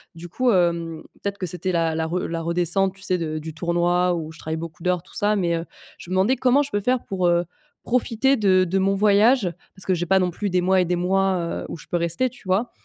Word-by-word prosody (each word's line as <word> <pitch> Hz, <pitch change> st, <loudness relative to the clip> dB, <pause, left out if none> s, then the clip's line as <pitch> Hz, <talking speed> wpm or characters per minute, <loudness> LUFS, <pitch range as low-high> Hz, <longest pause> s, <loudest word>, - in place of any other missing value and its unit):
du 170 Hz, +1 st, -9 dB
coup, 250 Hz, +7 st, +1 dB
hem, 170 Hz, -4 st, 0 dB, 0.2 s
peut-être 200 Hz, 0 st, -3 dB
que 185 Hz, -, -3 dB
c'était 180 Hz, +2 st, -3 dB
la 165 Hz, -2 st, 0 dB
la 160 Hz, -, -1 dB
re 175 Hz, +3 st, -1 dB
la 165 Hz, 0 st, -3 dB
redescente, 175 Hz, +3 st, 0 dB
tu 195 Hz, -, -18 dB
sais, 185 Hz, -1 st, +1 dB
de 155 Hz, -2 st, -3 dB
du 160 Hz, 0 st, -7 dB
tournoi 175 Hz, +2 st, +1 dB
où 160 Hz, -1 st, -5 dB
je 160 Hz, -, -15 dB
travaille 160 Hz, +1 st, -4 dB
beaucoup 165 Hz, 0 st, -8 dB
d'heures, 180 Hz, -1 st, 0 dB
tout -, -, -14 dB
ça 210 Hz, 0 st, +2 dB
mais 170 Hz, -3 st, +1 dB
heu, 165 Hz, +1 st, -3 dB, 0.3 s
je 175 Hz, -, -11 dB
me 185 Hz, -, -2 dB
demandais 200 Hz, +8 st, +3 dB
comment 260 Hz, +2 st, +3 dB
je 285 Hz, -, -8 dB
peux 205 Hz, -, 0 dB
faire 250 Hz, +3 st, +1 dB
pour, 185 Hz, -2 st, 0 dB
heu, 175 Hz, 0 st, +2 dB, 0.4 s
profiter 250 Hz, +2 st, +1 dB
de 190 Hz, -5 st, +3 dB
de 190 Hz, +3 st, 0 dB
mon 195 Hz, +1 st, +2 dB
voyage, 210 Hz, +2 st, +4 dB, 0.3 s
parce 190 Hz, -, -11 dB
que 185 Hz, -, +2 dB
j'ai 175 Hz, 0 st, -1 dB
pas 190 Hz, +3 st, +3 dB
non 180 Hz, -1 st, +1 dB
plus 205 Hz, +4 st, -3 dB
des 180 Hz, 0 st, +1 dB
mois 185 Hz, +1 st, +3 dB
et -, -, +1 dB
des 175 Hz, +1 st, 0 dB
mois, 190 Hz, +1 st, +1 dB, 0.3 s
heu, -, -, -8 dB
où -, -, -6 dB
je -, -, -14 dB
peux -, -, -3 dB
rester, 170 Hz, +10 st, 0 dB
tu 255 Hz, -, -17 dB
vois 195 Hz, +6 st, +1 dB
180 Hz, 265 wpm, -23 LUFS, 170-200 Hz, 0.4 s, voyage